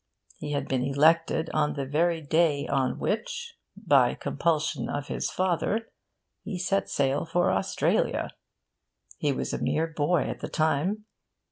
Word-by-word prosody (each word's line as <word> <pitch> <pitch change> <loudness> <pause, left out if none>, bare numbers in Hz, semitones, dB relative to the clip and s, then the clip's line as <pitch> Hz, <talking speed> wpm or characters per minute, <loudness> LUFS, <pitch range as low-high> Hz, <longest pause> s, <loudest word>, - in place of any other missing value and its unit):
He 145 0 -4
had 140 - -2
been 130 -2 0
elected 160 +4 +2
on 150 -1 +1
the 140 -2 -2
very 165 +4 +1
day 150 -1 +2
on 135 -2 0
which 475 -1 -3 0.2
(by - - +3
compulsion 160 -2 -1
of 145 -1 -4
his - - -2
father) 190 +5 -1 0.5
he 190 - -5
set 190 +2 0
sail 140 0 +1
for 175 +2 +1
Australia. - - 0 0.9
He 145 - +1
was 135 - -3
a - - -3
mere 160 - +1
boy 160 +1 +1
at - - -5
the - - -5
time. 170 +7 0
160 Hz, 145 wpm, -27 LUFS, 145-175 Hz, 0.9 s, by